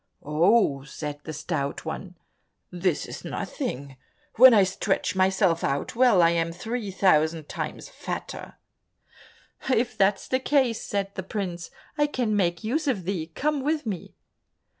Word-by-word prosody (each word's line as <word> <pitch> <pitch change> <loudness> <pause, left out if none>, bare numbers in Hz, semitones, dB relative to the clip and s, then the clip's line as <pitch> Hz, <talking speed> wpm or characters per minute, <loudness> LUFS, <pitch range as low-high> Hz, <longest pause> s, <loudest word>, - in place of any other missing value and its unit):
"Oh," 155 -1 +3
said 145 +1 -6
the 160 - -5
Stout 150 -2 -3
One, 180 +3 -6 0.6
"this 180 -2 0
is - - -8
nothing, 135 0 -5 0.4
when 255 +3 +10
I 210 -4 +6
stretch 190 0 -1
myself 190 -2 +2
out 140 +9 -1
well, 235 -7 +5
I 165 - +5
am 165 0 0
three 220 +5 -4
thousand 160 -5 +2
times - - -5
fatter." - - -7 1.2
"If 245 -1 +1
that's 195 +1 +2
the 260 - +1
case," 260 -4 +1
said 200 -1 -2
the 190 - -4
prince, 185 -3 -4 0.3
"I 295 - +4
can 245 -7 -1
make 175 -3 0
use 290 +8 -1
of 225 -9 0
thee, 175 -4 -2
come 300 0 0
with 300 0 0
me." 200 -6 -5
190 Hz, 145 wpm, -26 LUFS, 165-230 Hz, 1.2 s, when